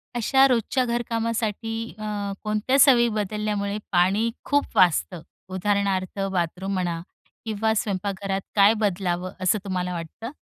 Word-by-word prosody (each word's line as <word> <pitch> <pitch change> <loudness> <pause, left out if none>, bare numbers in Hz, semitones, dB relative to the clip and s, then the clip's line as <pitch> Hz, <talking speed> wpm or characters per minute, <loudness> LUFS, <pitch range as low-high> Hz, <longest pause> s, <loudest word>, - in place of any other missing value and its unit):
अशा 265 +4 +4
रोजच्या 250 +1 +1
घरकामासाठी 230 -1 -2
अ, 205 -2 -3
कोणत्या 215 +5 +1
सवयी 250 -4 +6
बदलल्यामुळे 210 -1 -2
पाणी 195 +5 +3 0.2
खूप 285 0 +2
वाचतं? 180 -1 +3 0.3
उदाहरणार्थ 195 0 -1
बाथरूम 180 +2 -2
म्हणा 175 -3 -1 0.4
किंवा 220 0 0
स्वयंपाकघरात 195 -1 -2
काय 205 +1 +6
बदलावं 185 -3 -1
असं 185 +3 +3
तुम्हाला 180 -1 -2
वाटतं? 175 - -7
205 Hz, 115 wpm, -24 LUFS, 185-225 Hz, 0.4 s, सवयी